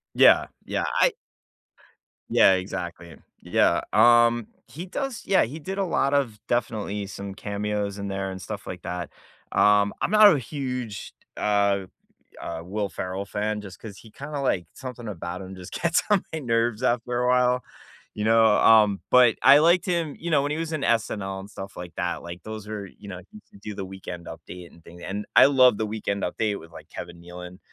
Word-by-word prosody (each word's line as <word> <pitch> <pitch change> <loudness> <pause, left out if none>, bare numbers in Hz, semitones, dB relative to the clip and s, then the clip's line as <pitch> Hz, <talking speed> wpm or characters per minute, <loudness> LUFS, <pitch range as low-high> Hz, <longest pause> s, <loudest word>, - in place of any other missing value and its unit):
Yeah, - - +6 0.2
yeah, - - -2 0.2
I - - +4 1.2
Yeah, 95 - +6
exactly. 85 -2 -5 0.3
Yeah, - - +2
um, 120 -1 +5 0.2
he 170 +5 -8
does 260 +6 -4
Yeah, 195 - +4
he 140 +8 -5
did 190 +6 -6
a 200 - +1
lot 140 -5 +1
of 125 -7 0
definitely 110 -4 -2
some 100 0 -7
cameos 100 0 -3
in 100 - -5
there 95 0 -3
and 95 0 -8
stuff 105 +1 -7
like 90 -2 -7
that, 90 0 -4 0.4
um, 105 0 +4
I'm - - 0
not 215 -2 +8
a 145 - 0
huge, 125 -5 -5
t - - -65 0.2
uh 100 -2 +2 0.6
uh, - - -5
Will 100 +3 -3
Ferrell 95 +2 -4
fan 105 +1 -3
just 100 -2 -11
'cause 105 -3 -9
he 110 - -15
kinda 145 +5 -7
like 95 -10 0
something 125 -4 -8
about 85 -2 -6
him 95 0 -8
just 90 -1 -11
gets 170 -1 +1
on 205 -3 +4
my - - -1
nerves 115 -3 0
after 120 0 0
a - - +1
while, 125 0 +3 0.5
you 105 - -4
know, 115 +1 +5
um, 105 -3 +5
but 125 -3 +6
I 140 - +8
liked 170 +4 +4
him, 170 -4 -1
you 170 - -5
know, 145 -3 +3
when 145 - -2
he 150 - -2
was 165 0 -3
in 155 -3 -2
SNL 100 -4 -1
and 95 - -10
stuff 95 -1 -9
like 90 -1 -8
that, 90 0 -2
like, 85 +1 -9
those 110 -1 -8
are 105 -2 -5
you 100 +2 -14
know, 90 -2 -7
he 105 - -12
used - - -23
to - - -16
do 105 +1 -7
the 95 -1 -5
Weekend 90 -2 -8
Update 90 -1 -10
and 85 - -20
thing 85 +1 -13
and 105 +2 -4
I - - +9
love 130 -5 +5
the 110 - -1
Weekend 105 -2 -3
Update 105 +3 -2
with, 80 +1 -14
like, - - -13
Kevin 85 0 -9
Nealon, 90 +1 -10
105 Hz, 200 wpm, -25 LUFS, 95-125 Hz, 1.2 s, I